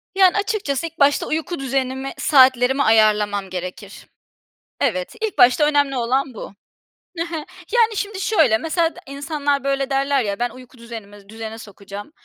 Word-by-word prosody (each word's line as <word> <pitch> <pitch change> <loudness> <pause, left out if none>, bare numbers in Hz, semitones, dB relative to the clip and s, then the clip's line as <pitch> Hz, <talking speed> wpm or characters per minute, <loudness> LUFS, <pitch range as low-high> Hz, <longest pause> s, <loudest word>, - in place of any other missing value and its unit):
Yani, 380 -1 +5
açıkçası 390 -9 -1
ilk 330 0 -15
başta 280 0 +3
uyku 320 +2 -3
düzenimi, 265 0 -2
saatlerimi 260 -1 +4
ayarlamam 210 -3 +3
gerekir. 185 +3 -7 0.7
Evet, 185 -9 -1
ilk 440 -2 -3
başta 250 +5 +6
önemli 285 -2 +2
olan 255 +2 0
bu. 210 - -8 0.7
Hı 330 - 0
hı. 340 0 -6 0.4
Yani, 460 -2 +3
şimdi 405 -1 -3
şöyle, 310 - +3
mesela 325 +5 -1
d - - -11
insanlar, 285 0 -2
böyle, 275 -1 -1
derler 275 0 +1
ya, 200 -1 -3
"Ben 245 0 0
uyku 255 0 -15
düzenimi 205 -4 -11
düzene 220 0 -7
sokacağım. 205 +2 -10
265 Hz, 150 wpm, -21 LUFS, 220-300 Hz, 0.7 s, başta